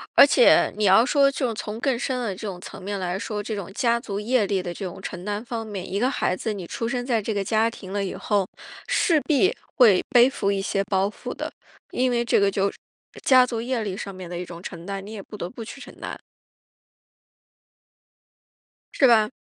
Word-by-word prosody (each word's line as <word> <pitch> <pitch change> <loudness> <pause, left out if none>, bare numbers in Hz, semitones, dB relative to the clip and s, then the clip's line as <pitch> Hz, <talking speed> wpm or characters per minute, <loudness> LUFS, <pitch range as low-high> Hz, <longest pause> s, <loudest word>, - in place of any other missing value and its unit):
而 - - +10
且 - - +5
你 210 - 0
要 195 +4 +6
说 275 0 +4
就 255 -4 -1
从 210 +1 -5
更 260 -1 +1
深 255 +1 -2
的 220 -6 -2
这 210 - -6
种 185 -3 -6
层 180 - -10
面 200 +1 -4
来 180 0 -2
说， 210 0 -3
这 215 +1 -4
种 195 -2 -6
家 235 +1 +2
族 205 -4 -5
业 220 0 +1
力 195 -1 0
的 175 -1 -4
这 195 - -6
种 180 0 -7
承 180 -2 -6
担 205 +2 -3
方 230 -2 -5
面， 195 -4 -6
一 200 - -1
个 250 +4 +2
孩 185 - 0
子 220 +3 -3
你 195 -4 -6
出 230 +6 -4
生 245 0 -2
在 235 -4 +1
这 215 +2 -2
个 200 -1 -1
家 220 +3 +2
庭 195 -4 -10
了 200 -1 0
以 190 - -4
后， 200 -3 0 0.4
势 325 -3 +3
必 325 - +2 0.2
会 220 -8 +6
背 245 -1 +6
负 200 -6 -1
一 195 -1 0
些 195 0 0
包 195 -1 +1
袱 205 - -7
的。 - - -5 0.4
因 255 +1 +1
为 240 -1 +1
这 - - +3
个 200 0 +4
就 200 0 0
是 - - -18 0.5
家 255 -1 +6
族 230 -2 -3
业 245 0 -1
力 200 -3 -3
上 195 0 -6
面 185 -2 -9
的 175 - -5
一 180 - -4
种 170 -1 -10
承 170 -2 -8
担， 195 0 -5
你 210 - -9
也 210 - -6
不 210 - -11
得 175 -3 -4
不 235 +1 -8
去 235 +5 -9
承 - - -11
担。 - - -6 2.7
是 270 - +5
吧？ 220 -3 +5
210 Hz, 250 characters per minute, -24 LUFS, 195-240 Hz, 2.7 s, 而